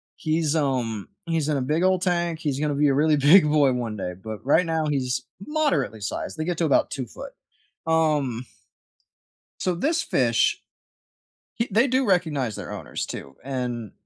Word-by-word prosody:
he's, 155 -1 0
um, 125 -8 -1 0.2
he's 165 -3 -1
in 150 - +1
a - - -1
big 150 +7 0
old 185 -1 +2
tank, 175 -3 0
he's 145 -4 -2
going 150 0 0
to 145 - -1
be 150 - +4
a 140 - +3
really 150 +2 +3
big 150 +6 +7
boy 145 -4 +4
one 115 -3 -3
day 90 -2 -4
but 110 +1 -7
right 160 +6 +4
now 160 -1 0
he's 130 -3 -1 0.2
moderately 180 - 0
sized. 100 +9 -4
They 155 - -2
get 175 -1 -2
to 170 - +2
about 145 - +3
2 130 -3 -3
foot. - - -10 0.5
Um 150 -7 +1 1.2
so 185 - 0
this 300 - 0
fish - - +2 1.0
h 230 - +1
they 225 +6 +4
do 260 0 +1
recognize 150 - +1
their - - -7
owners, - - -5
too 70 0 -8
and, 125 -5 -4
150 Hz, 180 wpm, -24 LUFS, 130-170 Hz, 1.2 s, big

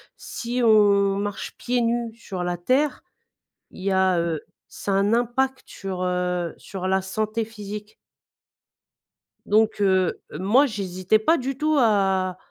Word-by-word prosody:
si 245 +1 -4
on 200 -3 +4
marche 205 0 -4
pieds 245 0 0
nus 235 -1 -1
sur 190 -6 -6
la 175 0 -2
terre, 265 - +1 0.7
il - - -12
y 195 - 0
a, 190 -2 +3
heu, 170 -2 -1 0.3
ça 200 - -4
a - - +2
un 200 +2 +2
impact 260 +3 0
sur, 190 -2 -5
heu, 180 -1 -1
sur 190 -2 -6
la 190 0 +2
santé 215 +3 -2
physique. 210 -1 -8 1.5
Donc 215 0 +2
heu, 190 -2 +2 0.2
moi, 235 +10 +4
j'hésitais 195 -2 0
pas 320 +10 +3
du 265 +1 -3
tout 310 +1 +1
à 190 -5 +2
205 Hz, 145 wpm, -24 LUFS, 185-230 Hz, 1.5 s, on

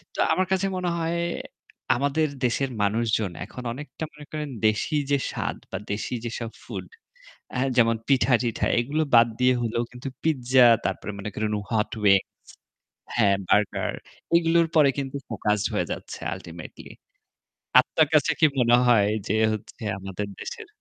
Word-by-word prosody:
তো - - -7
আমার 185 - +1
কাছে 190 0 +2
মনে 180 -1 -1
হয় 165 +1 -1 0.8
আমাদের 145 +4 +1 0.2
দেশের 130 +3 0
মানুষজন 110 -2 0
এখন 125 - -9
অনেকটা 150 +4 -8
মনে 150 0 -12
করেন 150 -2 -4 0.2
দেশি 110 +8 0 0.2
যে 140 - +4
স্বাদ - - -3
বা 95 - -2
দেশি 105 +4 -3
যেসব 115 0 -4
ফুড - - -6 0.7
হা 125 - +1 0.2
যেমন 115 -1 +5
পিঠা-টিঠা 125 -4 +2
এগুলো 145 +6 0
বাদ 115 0 +7
দিয়ে 125 0 +4
হলেও 115 +1 -1
কিন্তু 125 +2 -8 0.2
পিজ্জা 130 -5 +4 0.2
তারপরে 95 +3 -2
মনে 100 +2 -4
করেন 105 0 -1 0.2
hot 110 -1 +1
wings 100 -1 +5 0.9
হ্যাঁ, 100 -4 +4
বার্গার 105 +2 +1 0.4
এগুলোর 170 0 +4
পরে 150 -3 +6
কিন্তু 140 0 -3
focused 105 -2 0
হয়ে - - 0
যাচ্ছে - - -6 0.2
ultimately 85 -1 -10 0.9
আত্মার 150 +4 +3
কাছে 155 +1 +4
কি - - +6
মনে 120 0 +5
হয় 105 -4 +5 0.2
যে 105 - 0 0.2
হচ্ছে 110 +2 -8 0.2
আমাদের 95 +1 -5
দেশের 450 -3 -7
120 Hz, 145 wpm, -25 LUFS, 105-150 Hz, 0.9 s, বাদ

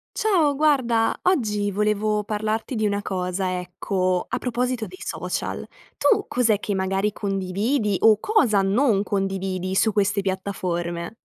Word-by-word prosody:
Ciao, 330 -10 +2
guarda 260 -7 +2
oggi 210 - +1
volevo 210 +1 0
parlarti 215 +4 -2
di 215 -1 0
una 205 0 0
cosa, 185 -1 -2
ecco 185 0 -1
a - - -2
proposito 250 -1 -1
dei 370 - -12
social, - - -4 0.3
tu 425 -4 +3
cos'è 225 -4 +2
che 210 - -3
magari 195 +2 0
condividi 200 +4 -1
o 220 -1 +6
cosa 245 - +3
non 205 +1 +2
condividi 190 -2 -2
su 220 +2 +3
queste 200 0 +1
piattaforme? 180 -2 -3
205 Hz, 135 wpm, -23 LUFS, 190-225 Hz, 0.3 s, o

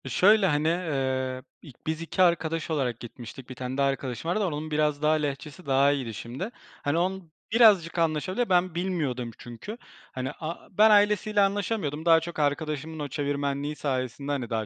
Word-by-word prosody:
Şöyle, 200 - +5
hani, 150 0 +1
ııı, 130 -6 -1 0.2
i 150 - -12 0.2
biz 160 0 -1
2 165 +3 -1
arkadaş 165 -2 +2
olarak 130 -6 -1
gitmiştik, 120 +1 -10
1 130 - -7
tane 130 +1 -5
daha 140 0 +3
arkadaşım 135 +3 -2
vardı. 210 +2 +1
Onun 155 -2 -3
biraz 150 -1 +1
daha 155 +1 +4
Lehçesi 150 +2 -3
daha 140 +1 +4
iyiydi 130 -5 -2
şimdi. 120 - -5 0.3
Hani, 145 +3 +1
onun 185 -1 -2 0.2
birazcık 205 -8 +5
anlaşabiliyor. 170 +8 0
Ben, 180 -1 +2
bilmiyordum 150 -10 -2
çünkü. 120 - -8 0.3
Hani, 130 0 -3
a 165 +1 -6
ben 215 +1 +7
ailesiyle 210 0 +4
anlaşamıyordum. 195 -6 -1
Daha 165 -1 +7
çok 165 0 -7
arkadaşımın 155 +1 -1
o 145 - -3
çevirmenliği 140 +1 -2
sayesinde, 135 0 -3
hani, 130 -5 -2
daha 110 -1 -1
150 Hz, 170 wpm, -27 LUFS, 135-175 Hz, 0.3 s, ben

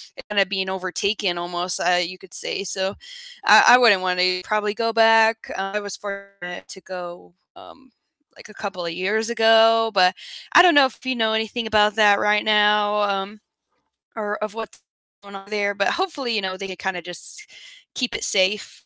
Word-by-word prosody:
it - - -12
kinda 200 -2 +2
being 190 0 -3
overtaken 190 0 -2
almost, 175 +1 -2
uh, 180 0 +2
you 180 +2 -5
could 190 - -15
say, 195 - -3
so 190 +1 -3 0.5
I - - +7
I - - +6
wouldn't 215 -7 +4
wanna 180 0 0
probably 210 -1 -2
go 230 -1 -2
back. 225 0 +3
Uh, 195 0 -4
I - - 0
was 205 -1 -6
fortunate 200 -3 -9
to 190 - -9
go, 175 -1 -10 0.2
um, 265 -1 -18 0.4
like, - - -16
a - - -14
couple 185 -5 -7
of 165 - -4
years 215 +6 -2
ago, 225 0 +4
but 180 -1 +4 0.4
I - - +9
don't 350 -4 +5
know 280 -2 +7
if 260 - -16
you 260 - -1
know 220 -1 0
anything 220 +1 -3
about 210 -1 +2
that 205 -2 +4
right 210 0 +1
now, 210 0 +2
um, 200 +1 -3 0.7
or 210 -1 -4
of 215 -1 -4
what's 225 -1 -8 0.4
going 200 0 -12
on 195 +1 -12
there, 205 -1 -2
but 200 - 0
hopefully, 315 -10 -3
you 210 - 0
know, 185 0 -4
they 195 - -7
can 185 -1 -9
kinda 185 -2 -4
just 180 - -6 0.5
keep 250 -2 -3
it - - -5
safe. 200 +2 0
205 Hz, 190 wpm, -21 LUFS, 190-220 Hz, 0.7 s, I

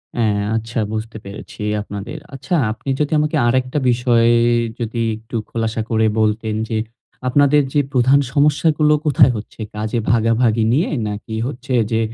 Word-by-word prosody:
হ্যাঁ 105 -3 +1
আচ্ছা, 115 +2 -4 0.2
বুঝতে 110 +1 -5
পেরেছি 100 +2 -10 0.2
আপনাদের। 105 +2 -7 0.2
আচ্ছা, 135 +7 -5 0.2
আপনি 115 +5 -7
যদি 150 -1 0
আমাকে 150 +1 0
আরেকটা 130 +3 0
বিষয়ে 120 -1 +3 0.5
যদি 115 0 -3 0.2
একটু 110 +2 -10
খোলাসা 115 -1 -2
করে 110 -1 +2
বলতেন, 110 0 0
যে 115 - -2 0.5
আপনাদের 145 +3 +4
যে 145 - +3
প্রধান 130 +1 +4
সমস্যাগুলো 150 +1 +3
কোথায় 135 -3 +5
হচ্ছে? 105 - -10 0.2
কাজে 110 +2 -2
ভাগাভাগি 115 0 +2
নিয়ে? 150 +7 +1 0.2
নাকি 105 +2 -6
হচ্ছে 135 -1 -5 0.2
যে 110 - +2
120 Hz, 145 wpm, -19 LUFS, 110-135 Hz, 0.5 s, কোথায়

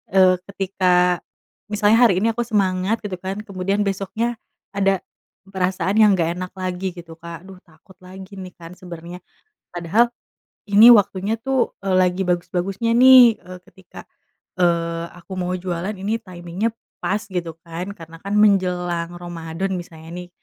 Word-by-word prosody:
eee, 185 -1 +5
ketika 180 -2 +1 0.5
misalnya 210 +2 +3
hari 190 -1 +1
ini 230 - +3
aku 235 +1 -3
semangat 195 0 0
gitu 185 -3 -5
kan 195 +3 -5
kemudian 195 0 -1
besoknya 205 +4 -2 0.3
ada 195 -2 +1 0.4
perasaan 190 +1 -1
yang 210 -2 +6
gak 170 0 -1
enak 185 0 -5
lagi 185 0 -4
gitu 165 -2 -12
Kak 170 +1 -9
aduh 190 -1 -13
takut 180 +4 -21
lagi 190 +2 -12
nih 185 -1 -9
kan 165 -1 -12
sebenernya 175 -1 -9 0.5
padahal 200 +8 +1 0.5
ini 210 +4 +8
waktunya 205 -1 +3
tuh, 265 +2 -1
eee, 195 -1 -1
lagi 185 0 +2
bagus-bagusnya 180 +5 -1
nih, 250 -2 +8
eee, 180 0 -11
ketika, 190 -1 -14 0.6
ee, 170 -1 +1
aku 175 +2 -13
mau 180 0 -2
jualan 180 +1 -3
ini 210 +4 -2
timing-nya 180 +3 -4 0.3
pas 205 - 0
gitu 175 -5 -5
kan 170 +4 -5
karena 165 -2 -12
kan 200 +1 -3
menjelang 180 -4 +2
Ramadhan 175 +2 -5
misalnya 165 -2 -10
nih 180 0 -7
185 Hz, 145 wpm, -21 LUFS, 175-200 Hz, 0.6 s, ini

